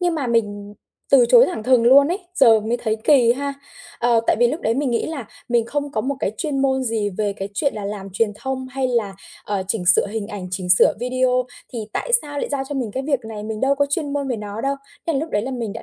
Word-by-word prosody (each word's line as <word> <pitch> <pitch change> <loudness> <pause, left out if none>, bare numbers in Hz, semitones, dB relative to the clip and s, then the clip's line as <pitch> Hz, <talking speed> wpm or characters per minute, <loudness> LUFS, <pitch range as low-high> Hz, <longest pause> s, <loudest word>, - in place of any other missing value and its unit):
nhưng 350 -1 +1
mà 290 -5 -2
mình 205 -3 -1 0.4
từ - - +7
chối - - +7
thẳng 350 -12 -4
thừng 255 -1 +4
luôn 280 +4 +7
ấy, 360 - -1 0.2
giờ 225 -7 +6
mới 225 +3 -1
thấy 220 -2 -2
kì 250 -6 +5
ha. 280 +2 -4 0.4
Ờ, 235 -1 +3
tại - - +3
vì 240 - +5
lúc 305 +8 -2
đấy 225 - 0
mình 275 -1 0
nghĩ 235 - 0
là 290 -8 -5 0.2
mình 235 -1 +1
không 285 +3 -3
có 215 - 0
một 275 +5 -2
cái 200 - -1
chuyên 285 +1 -2
môn 265 -1 +1
gì 220 -3 -1
về 205 +1 -2
cái 195 0 -6
chuyện 275 +5 0
là 210 -2 -5
làm 200 -1 -5
truyền 210 +1 0
thông, 260 +3 -4
hay 260 0 -2
là, 225 -5 -1 0.3
ờ, 200 -2 -2
chỉnh 195 -4 -1
sửa 180 - +5
hình 210 0 -4
ảnh, 200 -4 -6
chỉnh 185 0 -4
sửa 180 - +6
video 255 0 +1 0.3
thì 240 - -4
tại - - -3
sao 290 -1 -6
lại - - -2
giao 280 -2 -1
cho 290 - -4
mình 250 -5 -2
cái 265 - -3
việc 275 -2 0
này? 220 -2 -7
Mình 215 0 -5
đâu 275 +1 +3
có 285 0 +1
chuyên 285 -1 -1
môn 280 -1 -2
về 245 - -1
nó 210 +1 -6
đâu. 275 +1 0 0.3
Thế 330 - +1
là 275 - 0
lúc 320 +3 -4
đấy 205 - 0
là 260 - -4
mình 235 -5 -4
đã - - -8
245 Hz, 275 wpm, -21 LUFS, 215-280 Hz, 0.4 s, từ